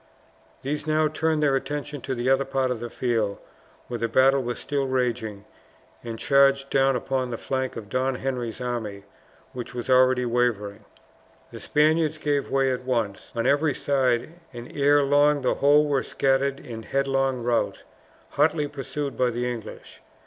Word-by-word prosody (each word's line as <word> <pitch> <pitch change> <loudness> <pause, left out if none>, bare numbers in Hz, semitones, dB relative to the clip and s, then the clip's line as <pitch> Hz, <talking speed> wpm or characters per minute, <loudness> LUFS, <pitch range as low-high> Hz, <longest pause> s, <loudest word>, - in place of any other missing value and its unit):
These 150 +3 -3
now 155 0 +3
turned 155 0 0
their 140 -2 +3
attention 145 0 -4
to 135 - -3
the 120 +1 -3
other 135 +1 +3
part 135 -1 -1
of 125 - -3
the 120 +1 -5
field 115 -4 -1 0.5
where 120 -1 -4
the 115 - 0
battle 135 +4 +4
was 120 -1 -4
still 140 -1 -2
raging, 120 -5 -2 0.6
and 115 -1 -6
charged 140 +1 +3
down 135 -1 +3
upon 130 +1 -2
the 115 - -4
flank 130 +1 -3
of 110 -3 -7
Don 130 +4 0
Henry's 125 -3 -4
army, 115 -5 -4 0.5
which 125 0 -7
was 125 +2 -3
already 130 0 +4
wavering. 110 -4 -1 0.7
The - - -9
Spaniards 155 +1 +2
gave 145 -2 -1
way 135 -1 +2
at 125 0 -3
once 115 -6 -2
on 115 - -1
every 145 0 +2
side, 130 0 0 0.2
and 120 -1 -10
ere 145 0 +4
long 145 +1 +3
the 130 - +1
whole 145 +2 +4
were 140 -3 +1
scattered 135 +1 0
in 115 -2 -8
headlong 135 0 0
rout, 120 -1 0 0.5
hotly 150 0 +1
pursued 140 0 -5
by 125 -1 +2
the 120 +1 -2
English. 115 -3 -8
130 Hz, 165 wpm, -25 LUFS, 120-140 Hz, 0.7 s, battle